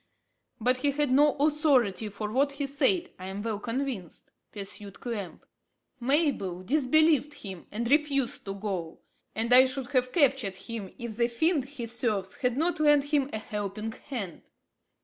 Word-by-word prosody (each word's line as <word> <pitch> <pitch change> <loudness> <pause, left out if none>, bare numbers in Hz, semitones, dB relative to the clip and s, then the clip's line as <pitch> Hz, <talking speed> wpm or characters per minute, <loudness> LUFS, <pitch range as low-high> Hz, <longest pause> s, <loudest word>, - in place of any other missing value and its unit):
"But 250 +3 +2
he 285 +3 +1
had 285 -1 +1
no 290 +3 +5
authority 275 - +2
for 210 +1 -5
what 280 +4 +2
he 280 0 -2
said, 285 +7 +1
I 185 - -7
am 195 +2 -5
well 220 -3 -2
convinced," 235 - -4 0.2
pursued 200 -1 -8
Clamp. 210 -7 -6 0.5
"Mabel 250 - 0
disbelieved 295 - +3
him 190 -4 -9
and 230 +3 -2
refused 280 -2 +1
to 195 -1 -4
go, 190 -5 -4 0.3
and 230 +2 +2
I 255 +1 +9
should 260 0 -3
have 255 -2 +2
captured 270 - +2
him 215 -2 -7
if 235 -3 -6
the 235 0 +3
fiend 285 +4 +2
he 270 -3 -6
serves 220 -5 -2
had 250 -1 0
not 330 +2 +1
lent 295 -1 +3
him 280 -2 +2
a - - -2
helping 210 0 -4
hand." 220 - -6
245 Hz, 160 wpm, -28 LUFS, 210-285 Hz, 0.5 s, I